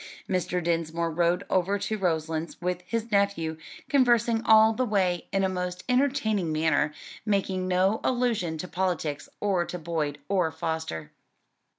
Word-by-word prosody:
Mr. 180 Hz, -1 st, -1 dB
Dinsmore 165 Hz, 0 st, -1 dB
rode 170 Hz, +2 st, +1 dB
over 190 Hz, +2 st, +1 dB
to 215 Hz, +2 st, -2 dB
Roselands 160 Hz, -4 st, -2 dB
with 180 Hz, 0 st, -2 dB
his 230 Hz, +1 st, -2 dB
nephew, 200 Hz, -6 st, +1 dB, 0.3 s
conversing 240 Hz, -4 st, +3 dB
all 220 Hz, 0 st, +7 dB
the 255 Hz, -, 0 dB
way 190 Hz, -6 st, 0 dB
in 195 Hz, 0 st, +1 dB
a -, -, +3 dB
most 180 Hz, -1 st, -3 dB
entertaining 250 Hz, -, +1 dB
manner, 155 Hz, -1 st, +2 dB, 0.3 s
making 190 Hz, -3 st, 0 dB
no 185 Hz, +4 st, +2 dB
allusion 230 Hz, -10 st, 0 dB
to 180 Hz, -, -5 dB
politics 175 Hz, -5 st, -2 dB
or 195 Hz, -4 st, +1 dB
to 180 Hz, -, -5 dB
Boyd 155 Hz, -3 st, -2 dB
or 185 Hz, -5 st, +1 dB
Foster. 160 Hz, -, -4 dB
180 Hz, 145 wpm, -27 LUFS, 165-210 Hz, 0.3 s, all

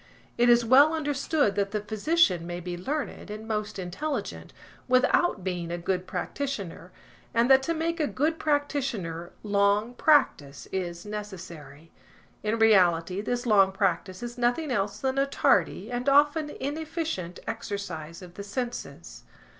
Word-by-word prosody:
It 240 Hz, 0 st, +3 dB
is 240 Hz, 0 st, +5 dB
well 280 Hz, +7 st, +6 dB
understood 290 Hz, -5 st, 0 dB
that 200 Hz, 0 st, 0 dB
the 210 Hz, +1 st, -2 dB
physician 210 Hz, -, +1 dB
may 175 Hz, 0 st, -4 dB
be 175 Hz, 0 st, -5 dB
learned, 280 Hz, +11 st, -4 dB
and 215 Hz, +1 st, -7 dB
most 210 Hz, -2 st, -3 dB
intelligent, 205 Hz, -, -4 dB, 0.4 s
without 255 Hz, -, +3 dB
being 175 Hz, -2 st, -3 dB
a 175 Hz, -, -3 dB
good 180 Hz, +1 st, -2 dB
practitioner, 200 Hz, -13 st, -5 dB, 0.4 s
and 235 Hz, +3 st, +3 dB
that 265 Hz, 0 st, +7 dB
to 335 Hz, +5 st, -2 dB
make 335 Hz, +2 st, -2 dB
a 305 Hz, -, +1 dB
good 310 Hz, +5 st, -1 dB
practitioner 265 Hz, -, -2 dB
long 205 Hz, +2 st, +2 dB
practice 245 Hz, -, +2 dB
is 175 Hz, -2 st, -4 dB
necessary. 175 Hz, -7 st, -8 dB, 0.5 s
In 215 Hz, +1 st, -1 dB
reality, 185 Hz, -4 st, +4 dB
this 245 Hz, +3 st, -2 dB
long 200 Hz, -4 st, +5 dB
practice 185 Hz, 0 st, -1 dB
is 240 Hz, 0 st, -6 dB
nothing 245 Hz, +5 st, +1 dB
else 200 Hz, -4 st, -1 dB
than 265 Hz, 0 st, -1 dB
a 275 Hz, -, +2 dB
tardy, 275 Hz, -, +1 dB
and 245 Hz, +3 st, 0 dB
often 295 Hz, +2 st, +4 dB
inefficient, 300 Hz, -, -4 dB
exercise 200 Hz, -7 st, -5 dB
of 175 Hz, -1 st, -12 dB
the 200 Hz, -, -7 dB
senses. 240 Hz, +4 st, -6 dB
215 Hz, 145 wpm, -27 LUFS, 185-275 Hz, 0.5 s, that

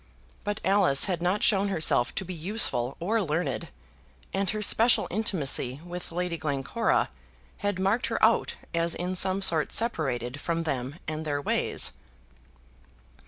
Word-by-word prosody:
But 205 Hz, +1 st, -3 dB
Alice 190 Hz, -8 st, +4 dB
had 180 Hz, -4 st, -2 dB
not 180 Hz, +4 st, 0 dB
shown 200 Hz, 0 st, +4 dB
herself 160 Hz, -9 st, +2 dB
to 190 Hz, -, -3 dB
be 185 Hz, -, -6 dB
useful 165 Hz, -, 0 dB
or 215 Hz, +6 st, 0 dB
learned, 165 Hz, -1 st, -2 dB, 0.7 s
and 195 Hz, -1 st, 0 dB
her 215 Hz, +2 st, -1 dB
special 230 Hz, +3 st, +4 dB
intimacy 150 Hz, -, 0 dB
with 175 Hz, 0 st, -5 dB
Lady 175 Hz, 0 st, -2 dB
Glencora 140 Hz, -4 st, 0 dB, 0.5 s
had 205 Hz, -1 st, -2 dB
marked 195 Hz, +6 st, +1 dB
her -, -, -2 dB
out -, -, +1 dB, 0.2 s
as 170 Hz, 0 st, +1 dB
in 180 Hz, +1 st, -3 dB
some 190 Hz, +2 st, +2 dB
sort 165 Hz, -5 st, +2 dB
separated 135 Hz, -, -2 dB
from 165 Hz, -1 st, -2 dB
them 135 Hz, -3 st, -3 dB
and 155 Hz, 0 st, -3 dB
their 145 Hz, -2 st, -2 dB
ways. 145 Hz, -, +1 dB
175 Hz, 145 wpm, -27 LUFS, 150-195 Hz, 0.7 s, Alice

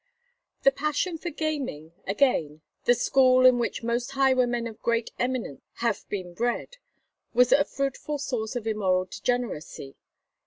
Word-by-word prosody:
The 275 Hz, -, +7 dB
passion 305 Hz, +4 st, -1 dB
for 345 Hz, -, -4 dB
gaming, 285 Hz, -, -4 dB, 0.2 s
again, 185 Hz, -, +1 dB, 0.2 s
"the 245 Hz, -, +5 dB
school 255 Hz, +1 st, +4 dB
in 250 Hz, -1 st, +7 dB
which 235 Hz, -, -2 dB
most 240 Hz, +3 st, -1 dB
highwaymen 255 Hz, -3 st, +2 dB
of 225 Hz, -2 st, -8 dB
great 230 Hz, -1 st, 0 dB
eminence 250 Hz, -, -2 dB
have 235 Hz, -3 st, -2 dB
been 185 Hz, -3 st, -5 dB
bred," 240 Hz, -, -2 dB, 0.6 s
was 250 Hz, 0 st, +5 dB
a 285 Hz, -, +6 dB
fruitful 275 Hz, +2 st, -3 dB
source 245 Hz, -5 st, -3 dB
of 240 Hz, -3 st, -3 dB
immoral 190 Hz, -4 st, +1 dB
degeneracy. 190 Hz, -, -3 dB
245 Hz, 140 wpm, -26 LUFS, 215-270 Hz, 0.6 s, The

